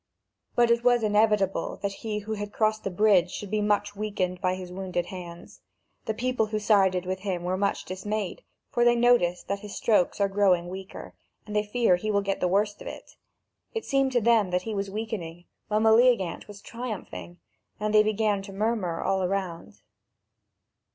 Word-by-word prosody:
But 240 -1 +4
it 235 0 +2
was 245 -2 +4
inevitable 210 -2 +2
that 200 - 0
he 215 -2 -3
who 220 - -3
had 205 -1 -5
crossed 215 0 0
the - - -1
bridge 190 -2 +3
should 205 +1 -7
be 215 0 +1
much 205 0 0
weakened 190 -4 -2
by 185 0 +1
his 185 -1 -8
wounded 185 -2 -3
hands. 175 -2 -10 0.4
The 220 -2 -2
people 250 -2 0
who 215 0 -2
sided 195 -4 +3
with 185 +1 -3
him 185 -3 -3
were 180 +1 -1
much 200 +1 -1
dismayed, 195 +1 -4 0.3
for 240 - +2
they 240 0 +5
notice 235 -8 +3
that 200 0 -3
his 205 0 -9
strokes 210 -5 +2
are 200 - +3
growing 190 -3 +2
weaker, 190 +1 -8 0.3
and 210 0 -7
they 210 - +4
fear 210 -3 +2
he 215 +4 -4
will 200 -1 +1
get 195 0 -1
the 180 - +1
worst 205 +3 0
of - - -8
it; - - -9 0.6
it 450 - -3
seemed 270 -1 +1
to 240 - +3
them 225 -3 +3
that 180 0 0
he 220 - -4
was 200 -1 -2
weakening, 195 -5 -5 0.2
while 215 0 +1
Meleagant 220 -5 +3
was 205 -1 -12
triumphing, 195 - -7 0.4
and 210 0 -1
they 215 - +7
began 215 -1 +1
to 195 0 -10
murmur 205 -4 -1
all 195 0 +1
around. 180 - -3
205 Hz, 190 wpm, -27 LUFS, 185-215 Hz, 0.6 s, they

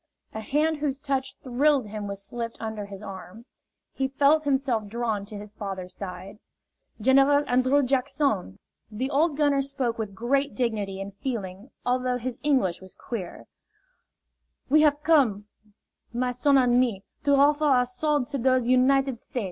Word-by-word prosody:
A 220 - -4
hand 300 +7 0
whose 285 -2 -2
touch 270 -2 -2
thrilled 270 +1 +2
him 210 0 -6
was 200 0 -5
slipped 230 0 -5
under 220 -2 -5
his 200 0 -10
arm. 195 +3 -9 0.5
He 265 - -1
felt 285 +3 +3
himself 265 -6 0
drawn 220 -2 -2
to 210 -1 -8
his 205 0 -10
father's 190 -3 -6
side. 190 +2 -8 0.6
"General 275 +5 +4
An 250 +1 +2
drrew 275 +3 +3
Jack 265 +1 0
son," 265 - -1 0.3
the 250 +6 -3
old 295 +1 +2
gunner 290 -2 +3
jpoke 265 -4 -2
with 205 -3 -4
great 275 +6 0
dignity 210 -6 -2
and 195 0 -6
feeling 210 -4 -5 0.2
although 250 0 0
his 250 0 -5
English 255 - +1
was 190 0 -13
queer, 195 -8 -7 1.2
"we 305 +3 +5
haf 295 -1 +3
come, 255 -11 +3 0.7
my 250 +1 -1
son 275 +3 +3
an' 245 -2 +4
me, 225 -6 0 0.2
to 285 -1 +4
hoffer 290 +2 +4
ou' 255 -4 +4
swo'de 280 +2 0
to 275 - -2
dose 255 0 +2
United 260 0 +3
State'. 250 - -5
250 Hz, 165 wpm, -26 LUFS, 210-275 Hz, 1.2 s, we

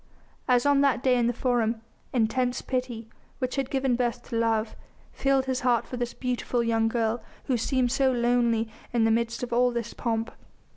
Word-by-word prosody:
As 245 -1 +3
on 285 -1 +4
that 270 -3 +2
day 255 -1 +4
in 240 -1 +2
the - - +2
Forum, 240 -2 0 0.3
intense 245 +1 0
pity 250 -3 -3 0.3
which 255 -2 -2
had 270 -2 -1
given 265 -2 +1
birth 240 0 -1
to 235 - -4
love 225 -1 0 0.4
filled 270 -1 +1
his 260 -1 -1
heart 245 -3 +2
for - - -7
this 245 -1 -3
beautiful 250 -1 -1
young 225 -1 +2
girl 225 0 0 0.2
who 260 - 0
seemed 245 +1 +1
so 270 0 +3
lonely 235 -2 +2 0.3
in 235 -2 +3
the 225 - +3
midst 230 +1 0
of 240 -1 -4
all 250 +1 +4
this 235 -1 -4
pomp. 225 -1 -2
245 Hz, 190 wpm, -27 LUFS, 230-255 Hz, 0.4 s, on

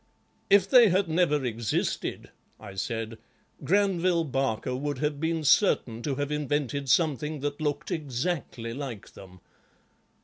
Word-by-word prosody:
'If 200 -1 +5
they 240 -1 +7
had 185 +1 +2
never 155 -4 +1
existed,' 115 -2 -2 0.3
I 100 -3 -10
said, 115 +2 -4 0.4
'Granville 185 -3 +2
Barker 130 -4 -1
would 145 +1 -3
have 150 +1 -2
been 160 0 -1
certain 130 - +3
to 140 +1 -2
have 145 +1 -3
invented 145 -2 -2
something 150 -1 +1
that 145 +1 -3
looked 145 -2 -2
exactly 135 -5 -3
like 130 -6 -7
them. 95 -2 -14
145 Hz, 130 wpm, -27 LUFS, 125-165 Hz, 0.4 s, they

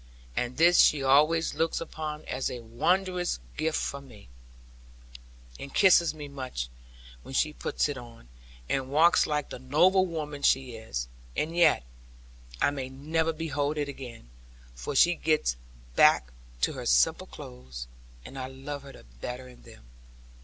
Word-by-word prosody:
And 125 +1 -2
this 175 +2 +6
she 145 -2 +5
always 155 +5 +4
looks 165 0 0
upon 155 -2 -6
as 130 +1 -2
a 125 - -6
wondrous 180 +10 0 0.2
gift 155 +1 0
from 140 0 -4
me; 90 - -15 1.3
and 140 - -8
kisses 175 -4 +6
me 150 -2 -8
much 130 - -5 0.5
when 135 - -9
she 155 +2 +2
puts - - -1
it 145 -3 -4
on, 115 - -13 0.4
and 135 -1 -1
walks 160 +5 +5
like 150 -1 -1
the - - -6
noble 180 +9 +4
woman 150 -4 -5
she 130 -2 +2
is. 110 - -5 0.3
And 165 +2 -1
yet 175 - +4 0.8
I - - +3
may 135 -2 -5
never 160 +5 -1
behold 155 -2 -2
it 145 -1 -1
again; 120 - -9 0.4
for 100 - -5
she 175 +6 +6
gets 155 - +1 0.4
back 60 -1 +5 0.3
to - - +2
her - - -5
simple - - +3
clothes, 60 -1 -9 0.4
and 135 - -8
I 130 - -4
love 135 +2 -7
her 140 0 -12
the - - -14 0.2
better 125 - -6
in 125 - -15
them. - - -15
140 Hz, 155 wpm, -28 LUFS, 125-160 Hz, 1.3 s, this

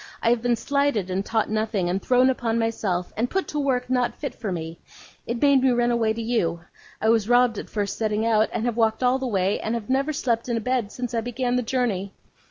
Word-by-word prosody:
I 230 - +4
have 240 -1 +1
been 245 0 +2
slighted, 280 -6 0
and 190 +2 -1
taught 220 +1 0
nothing, 215 -4 0
and 185 +2 -1
thrown 255 +1 +4
upon 230 -3 -1
myself, 215 -6 -1
and 235 +3 -1
put 385 0 -1
to 300 - -2
work 255 -3 0
not 250 -1 0
fit 285 -4 -5
for 215 -4 -5
me. 165 -1 -5 0.5
It 235 0 -2
made 280 -1 +4
me 260 - +4
run 240 -1 +2
away 230 -2 +2
to 225 +1 -3
you. 170 -8 0 0.4
I 220 - +1
was 225 -1 +2
robbed 245 -3 +4
at - - -8
first 205 -2 -3
setting 215 0 0
out, 220 -1 +3
and 225 - -2
have 240 -1 -1
walked 225 +1 +1
all 250 +1 +3
the 265 - -2
way, 195 -3 0
and 220 +2 -2
have 230 +1 -4
never 275 +3 +1
slept 240 -5 -1
in 235 - 0
a - - 0
bed 240 -2 -1
since 245 -1 -5
I 230 - 0
began 245 +1 -2
the 250 - +2
journey. 225 -6 -1
230 Hz, 245 wpm, -24 LUFS, 215-250 Hz, 0.5 s, I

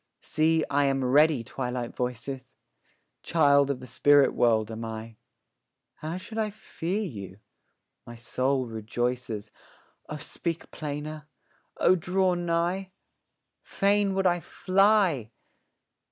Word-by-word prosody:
See, 160 0 +2
I 145 0 +2
am 135 -1 +1
ready, 145 0 +4
Twilight 125 0 -4
voices! 125 +2 -4 0.7
Child 140 -4 +4
of 140 -2 -1
the 130 - -9
spirit 140 +3 +4
world 110 -2 +2
am 110 +1 -6
I; 110 0 -7 0.8
How 160 +3 -4
should 220 +4 -6
I 215 -1 0
fear 205 -1 -4
you? 100 - -7 0.7
my 120 - -8
soul 130 +3 -1
rejoices, 115 -1 -3 0.6
O 150 - -4
speak 165 +2 -4
plainer! 150 0 -6 0.5
O 185 - +5
draw 185 +2 +1
nigh! 175 +2 -1 0.7
Fain 200 0 +1
would 195 0 0
I 175 -1 +3
fly! 185 - +2
145 Hz, 115 wpm, -27 LUFS, 125-175 Hz, 0.8 s, O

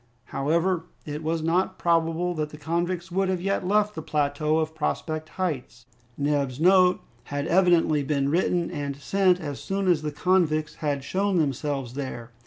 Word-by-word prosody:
However, 165 +5 +1 0.2
it 150 0 -5
was 160 0 -1
not 170 +3 +1
probable 170 +1 +1
that 155 -2 -2
the 150 - -11
convicts 175 +4 -2
would 190 +1 +1
have 185 -1 0
yet 195 0 -1
left 210 +1 +2
the 160 - -5
plateau 150 +1 0
of 160 0 -1
Prospect 155 0 -3
Heights. 135 -9 -3 0.3
Neb's 140 -2 0
note 180 +1 +5 0.2
had 145 0 -3
evidently 170 -3 +3
been 140 0 0
written 175 +1 +1
and 145 -4 -3
sent 185 +4 +2
as 145 -4 -5
soon 195 0 -2
as 170 -4 +3
the 150 -1 -3
convicts 155 -2 +1
had 145 -3 -1
shown 195 +5 0
themselves 140 -4 -1
there. 130 -4 -6
160 Hz, 165 wpm, -26 LUFS, 145-180 Hz, 0.3 s, note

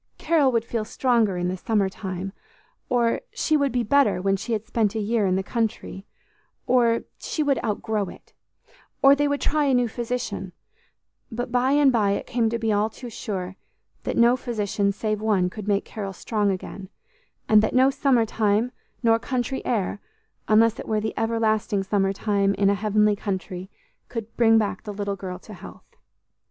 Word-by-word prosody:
"Carol 300 -6 +3
would 230 -2 0
feel 230 -1 -2
stronger 225 -4 +1
in 175 0 -1
the 180 - -1
summer 200 +1 0
time;" 190 0 -5 0.6
or, 240 - +1
"She 310 - +1
would 280 -2 +2
be 245 -1 0
better 235 -4 +3
when 195 +1 +1
she 215 +5 -4
had 215 0 -2
spent 220 -2 0
a - - 0
year 215 -1 +1
in 185 - +2
the 190 - 0
country;" 215 -3 -3 0.6
or, 235 -2 +3 0.2
"She 310 - -2
would 275 -4 +1
outgrow 215 -1 -1
it;" - - -15 0.7
or, 275 0 +8
"They 290 +1 +2
would 285 0 -1
try 300 -1 +1
a 270 -2 +3
new 245 -1 +2
physician;" 225 -5 -4 0.8
but 245 +2 -4
by 250 +2 +2
and 290 -2 +5
by 210 -5 +2
it - - -3
came 230 -2 0
to 235 - -1
be 225 -1 0
all 210 +1 +1
too 240 +2 -10
sure 190 -3 -5 0.4
that - - -3
no 235 +1 +5
physician 210 -5 -1
save 215 +1 -2
One 195 -5 +1
could 210 0 -8
make 200 -1 +1
Carol 200 -3 -6
strong 210 +1 -1
again, 190 0 -5 0.6
and 215 -1 +6
that 220 - -1
no 260 +2 +5
"summer 260 -4 +2
time" 215 +2 +1 0.3
nor 225 -1 +4
"country 255 +2 -2
air," 205 -4 -1 0.5
unless 225 +1 +4
it - - -7
were 215 -1 +1
the 220 +1 -3
everlasting 220 -2 0
summer 195 0 +1
time 200 0 0
in 200 +1 +3
a - - +3
heavenly 210 +1 +2
country, 190 -2 -5 0.4
could 230 -2 -6
bring 225 -1 +5
back 210 -2 0
the 210 - -7
little 200 0 -3
girl 185 -1 -6
to 210 +4 -13
health. 180 - -13
220 Hz, 185 wpm, -24 LUFS, 200-240 Hz, 0.8 s, or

